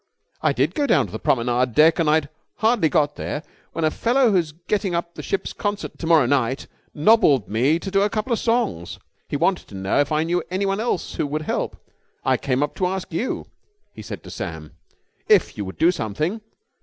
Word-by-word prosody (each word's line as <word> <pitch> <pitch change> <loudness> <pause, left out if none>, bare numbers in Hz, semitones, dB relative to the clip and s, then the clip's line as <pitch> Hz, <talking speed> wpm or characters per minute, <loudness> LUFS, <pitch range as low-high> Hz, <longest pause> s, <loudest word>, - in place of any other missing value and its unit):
"I - - +3
did - - +1
go 290 -2 0
down 140 - +3
to 95 - -11
the 110 - -5
promenade 125 0 +1
deck. 160 +3 +5
And 160 -2 +2
I'd 155 -1 +3 0.3
hardly 220 -7 +2
got 145 0 +1
there 150 - -4 0.3
when 165 - -1
a 155 - +2
fellow 245 +4 +2
who's 175 -6 +1
getting 180 +3 -2
up 170 0 -3
the - - -7
ship's 195 - -3
concert 205 -1 -4
to 165 - -4
morrow 160 -5 +5
night 130 0 0 0.3
nobbled 150 - +4
me 125 +9 +2
to 195 +3 -6
do 195 0 +3
a 205 - +2
couple 215 +4 -1
of 230 - 0
songs. 225 - -1 0.3
He - - -2
wanted - - 0
to - - -11
know 95 +6 0
if 145 0 +1
I 155 +1 +2
knew 175 +2 0
anyone 195 +2 -1
else 225 -6 -2
who - - 0
would 155 +2 -3
help. - - -2 0.5
I - - +4
came 135 0 0
up 145 - -2
to 185 - +1
ask 185 -2 -4
you," 220 +10 -2 0.5
he 110 - -10
said 105 - -8
to - - -10
Sam, 80 -2 -6 0.6
"if - - +4
you 100 - -4
would 95 - -8
do 170 +2 +4
something." 155 - -3
160 Hz, 215 wpm, -22 LUFS, 135-195 Hz, 0.6 s, deck